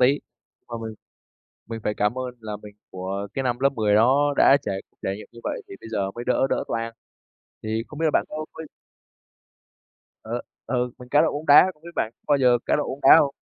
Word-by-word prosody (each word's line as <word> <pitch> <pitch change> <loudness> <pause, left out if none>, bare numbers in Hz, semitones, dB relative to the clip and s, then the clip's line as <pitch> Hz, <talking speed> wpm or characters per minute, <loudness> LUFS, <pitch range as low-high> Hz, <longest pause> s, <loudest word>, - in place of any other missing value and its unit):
tí, 135 +3 +4 0.5
mà 120 - -6
mình 110 -1 -5 0.7
mình 115 +1 -6
phải 105 - 0
cảm 105 +5 0
ơn 125 -1 -4
là 105 -1 -5
mình 105 -1 -11 0.2
của 95 +2 -4
cái 135 - -1
năm 120 -1 0
lớp 140 +1 +4
10 105 -3 +2
đó 135 +6 +4
đã 135 - +7
trải 95 -7 -3 0.2
trải 95 - -2
nghiệm 105 - -11
như 120 - -12
vậy - - -3
thì - - -9
bây - - -10
giờ 100 -3 -1
mới 120 +4 -7
đỡ 125 +1 +2
đỡ - - 0
toang, 115 0 -2 0.7
thì 110 +1 -1
không 150 - -10
biết 165 - 0
là - - +3
bạn - - +3
có 155 0 -5
có - - -8 1.6
Ờ, - - -3 0.3
ừ, 125 +1 0
mình 125 - -12
cá 145 +3 +4
độ 160 - +1
bóng 150 +2 -5
đá, 150 +6 +8
không 150 - -31
biết 170 - -9
bạn 110 - 0
có - - -59
bao 145 - +5
giờ 125 -2 +4
cá - - +3
độ 150 - 0
bóng 135 - -5
đá - - +11
hông? 140 -3 +2
120 Hz, 235 wpm, -24 LUFS, 110-140 Hz, 1.6 s, đá